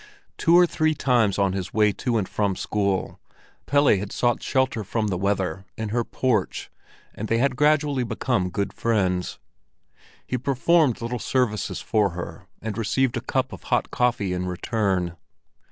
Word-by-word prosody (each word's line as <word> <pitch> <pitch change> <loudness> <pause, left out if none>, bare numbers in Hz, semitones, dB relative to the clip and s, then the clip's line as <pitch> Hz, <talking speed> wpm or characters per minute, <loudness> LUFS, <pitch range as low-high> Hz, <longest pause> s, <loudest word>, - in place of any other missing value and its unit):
Two 170 +1 +4
or 180 - +7
three 155 -2 0
times 120 -8 +2
on 100 -2 +2
his 95 -1 -5
way 105 -1 +4
to 120 +3 -1
and 100 -4 -1
from 100 -3 0
school, 100 -2 -1 0.5
Pelle 145 +1 +3
had 100 0 +1
sought 120 -1 +1
shelter 130 -4 0
from 105 +2 -1
the 95 - -1
weather 95 0 -1
in 110 -1 -3
her 120 +2 0
porch, 115 -5 -1 0.4
and 110 - -5
they 115 - +1
had 130 +2 +1
gradually 145 -1 +2
become 115 -5 -1
good 100 +1 -2
friends; 95 -6 0 0.9
he 125 - -2
performed 140 0 +2
little 120 +1 -3
services 110 -6 -1
for 105 -3 +2
her, 90 - -7 0.2
and 110 -1 -4
received 125 +3 +1
a - - -2
cup - - -1
of - - -10
hot - - +1
coffee 115 -6 +1
in 90 0 -2
return. 90 -2 -1
110 Hz, 165 wpm, -24 LUFS, 100-125 Hz, 0.9 s, or